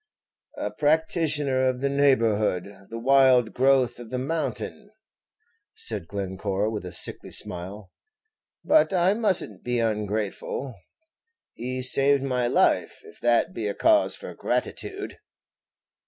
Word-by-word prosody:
"A -, -, -3 dB
practitioner 150 Hz, -4 st, +1 dB
of 125 Hz, 0 st, -4 dB
the 140 Hz, -, +1 dB
neighborhood, 110 Hz, -8 st, +1 dB
the 115 Hz, -, -6 dB
wild 130 Hz, -1 st, +4 dB
growth 130 Hz, -2 st, +2 dB
of 120 Hz, -2 st, -10 dB
the 130 Hz, -, -3 dB
mountain," 135 Hz, -3 st, -4 dB, 0.9 s
said 85 Hz, -, -1 dB
Glencore, 100 Hz, +2 st, -3 dB
with 105 Hz, -3 st, -5 dB
a 90 Hz, -, -7 dB
sickly -, -, 0 dB
smile; 90 Hz, +3 st, -4 dB, 0.7 s
"but 310 Hz, -9 st, +4 dB
I 180 Hz, +1 st, +3 dB
must 210 Hz, -5 st, +3 dB
n't 100 Hz, -3 st, -12 dB
be 125 Hz, 0 st, -1 dB
ungrateful; 110 Hz, +3 st, -3 dB, 0.8 s
he 130 Hz, +2 st, -5 dB
saved 135 Hz, +1 st, +4 dB
my 125 Hz, -3 st, 0 dB
life, -, -, +1 dB
if -, -, -15 dB
that 120 Hz, -1 st, +1 dB
be 110 Hz, -2 st, -3 dB
a 100 Hz, -, -3 dB
cause 320 Hz, -1 st, +3 dB
for -, -, -9 dB
gratitude." 400 Hz, 0 st, -3 dB
125 Hz, 125 wpm, -25 LUFS, 105-140 Hz, 0.9 s, wild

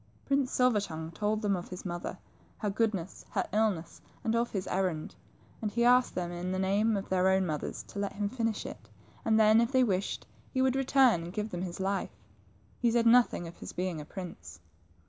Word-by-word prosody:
Prince 275 Hz, -2 st, +1 dB
Silver 250 Hz, -4 st, +3 dB
tongue 160 Hz, -4 st, -5 dB
told 210 Hz, +5 st, -1 dB
them 200 Hz, -2 st, +2 dB
of 175 Hz, -, -5 dB
his 180 Hz, +1 st, -8 dB
mother, 175 Hz, -1 st, -4 dB, 0.4 s
her 210 Hz, -3 st, -1 dB
goodness, 195 Hz, -4 st, -1 dB
her 195 Hz, -, 0 dB
illness, 205 Hz, -6 st, 0 dB, 0.2 s
and 225 Hz, -2 st, +1 dB
of 235 Hz, +1 st, +1 dB
his 195 Hz, -3 st, -3 dB
errand, 180 Hz, -5 st, -1 dB, 0.5 s
and 215 Hz, -, -1 dB
he 235 Hz, +3 st, 0 dB
asked 250 Hz, +1 st, +5 dB
them 175 Hz, -1 st, -2 dB
in 175 Hz, +1 st, -3 dB
the 185 Hz, -, -1 dB
name 200 Hz, +3 st, +2 dB
of 195 Hz, -, -4 dB
their 185 Hz, 0 st, +3 dB
own 190 Hz, 0 st, +3 dB
mothers 155 Hz, -4 st, -3 dB
to 200 Hz, -, -8 dB
let 200 Hz, -1 st, -2 dB
him 205 Hz, 0 st, -1 dB
finish 225 Hz, -1 st, -2 dB
it -, -, -9 dB, 0.2 s
\ -, -, -27 dB
and 220 Hz, 0 st, +4 dB
then, 220 Hz, +1 st, +6 dB
if 235 Hz, +2 st, 0 dB
they 260 Hz, -1 st, +4 dB
wished, 195 Hz, -4 st, -1 dB, 0.2 s
he 260 Hz, -, -2 dB
would 260 Hz, 0 st, +3 dB
return 265 Hz, -7 st, +4 dB
and 175 Hz, -, -8 dB
give 210 Hz, +1 st, -3 dB
them 175 Hz, -, -3 dB
his 180 Hz, -2 st, -4 dB
fife. 195 Hz, 0 st, -2 dB, 0.6 s
He 240 Hz, -, +3 dB
said 235 Hz, 0 st, +2 dB
nothing 230 Hz, -7 st, +4 dB
of 170 Hz, -, -11 dB
his -, -, -8 dB
being 180 Hz, -3 st, -2 dB
a -, -, -9 dB
prince. 165 Hz, -, -8 dB
200 Hz, 215 wpm, -30 LUFS, 180-230 Hz, 0.6 s, then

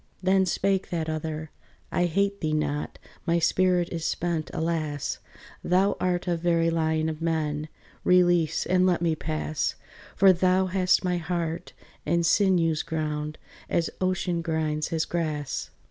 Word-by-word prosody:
Then 190 Hz, 0 st, +3 dB
spake 195 Hz, +2 st, 0 dB
that 160 Hz, -2 st, -2 dB
other, 155 Hz, 0 st, -4 dB, 0.4 s
"I 175 Hz, -, +2 dB
hate 200 Hz, +4 st, 0 dB
thee 155 Hz, -1 st, 0 dB
not, 150 Hz, -1 st, -2 dB, 0.3 s
My 170 Hz, 0 st, +3 dB
spirit 180 Hz, +1 st, +2 dB
is 165 Hz, -2 st, -4 dB
spent, 165 Hz, -2 st, -1 dB
alas, 155 Hz, -3 st, -2 dB, 0.4 s
Thou 190 Hz, +3 st, +2 dB
art 180 Hz, 0 st, 0 dB
a 175 Hz, -, +2 dB
very 165 Hz, 0 st, +1 dB
lion 160 Hz, -1 st, +1 dB
of 160 Hz, 0 st, -4 dB
men; 155 Hz, -2 st, -1 dB, 0.3 s
Release, 175 Hz, -3 st, +3 dB
and 185 Hz, +1 st, +3 dB
let 175 Hz, -2 st, +1 dB
me 165 Hz, -2 st, +2 dB
pass; 155 Hz, -1 st, -2 dB, 0.4 s
For 195 Hz, -1 st, +6 dB
thou 185 Hz, +1 st, +2 dB
hast 185 Hz, 0 st, +2 dB
my 180 Hz, -1 st, +1 dB
heart 170 Hz, -1 st, -3 dB, 0.3 s
and 170 Hz, 0 st, +1 dB
sinews 165 Hz, -4 st, +3 dB
ground 150 Hz, -1 st, -3 dB, 0.3 s
As 170 Hz, -, 0 dB
ocean 185 Hz, -2 st, 0 dB
grinds 155 Hz, -2 st, -1 dB
his 160 Hz, -1 st, -1 dB
grass." 155 Hz, -5 st, -3 dB
165 Hz, 145 wpm, -26 LUFS, 155-180 Hz, 0.4 s, For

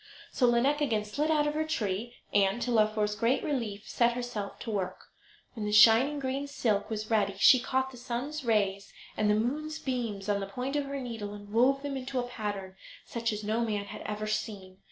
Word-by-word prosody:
So 250 Hz, -, +3 dB
Lineik 260 Hz, +5 st, +3 dB
again 220 Hz, -7 st, +1 dB
slid 290 Hz, +9 st, -1 dB
out 300 Hz, -2 st, +3 dB
of 295 Hz, -, 0 dB
her 310 Hz, +1 st, 0 dB
tree, 235 Hz, -5 st, -2 dB, 0.2 s
and, 200 Hz, +2 st, +3 dB
to 245 Hz, -, -1 dB
Laufer's 215 Hz, -2 st, +2 dB
great 230 Hz, +5 st, +1 dB
relief, 215 Hz, -8 st, -3 dB
set 235 Hz, 0 st, +2 dB
herself 240 Hz, -5 st, -4 dB
to 230 Hz, -, -4 dB
work. 190 Hz, -3 st, -4 dB, 0.4 s
When 220 Hz, -, -5 dB
the -, -, -1 dB
shining 230 Hz, +7 st, +6 dB
green 275 Hz, +1 st, -2 dB
silk 225 Hz, -8 st, 0 dB
was 215 Hz, 0 st, -4 dB
ready 200 Hz, -3 st, +2 dB
she 255 Hz, +6 st, +7 dB
caught 260 Hz, +1 st, -1 dB
the 255 Hz, -, -12 dB
sun's 255 Hz, +5 st, -4 dB
rays 200 Hz, -4 st, 0 dB, 0.2 s
and 215 Hz, -1 st, +1 dB
the 210 Hz, -, +4 dB
moon's 300 Hz, +8 st, -1 dB
beams 235 Hz, -9 st, -3 dB
on 205 Hz, -1 st, +1 dB
the 195 Hz, -, -4 dB
point 250 Hz, +7 st, -4 dB
of 290 Hz, -1 st, 0 dB
her 275 Hz, 0 st, -4 dB
needle 225 Hz, -5 st, -5 dB
and 205 Hz, 0 st, -11 dB
wove 270 Hz, +4 st, +3 dB
them 285 Hz, -1 st, -3 dB
into 265 Hz, 0 st, -4 dB
a -, -, 0 dB
pattern 205 Hz, -5 st, -5 dB, 0.3 s
such 230 Hz, 0 st, -2 dB
as 210 Hz, 0 st, -4 dB
no 220 Hz, +3 st, 0 dB
man 210 Hz, -3 st, -2 dB
had 200 Hz, -, -8 dB
ever 215 Hz, 0 st, -4 dB
seen. 200 Hz, -3 st, -4 dB
230 Hz, 210 wpm, -30 LUFS, 210-260 Hz, 0.4 s, she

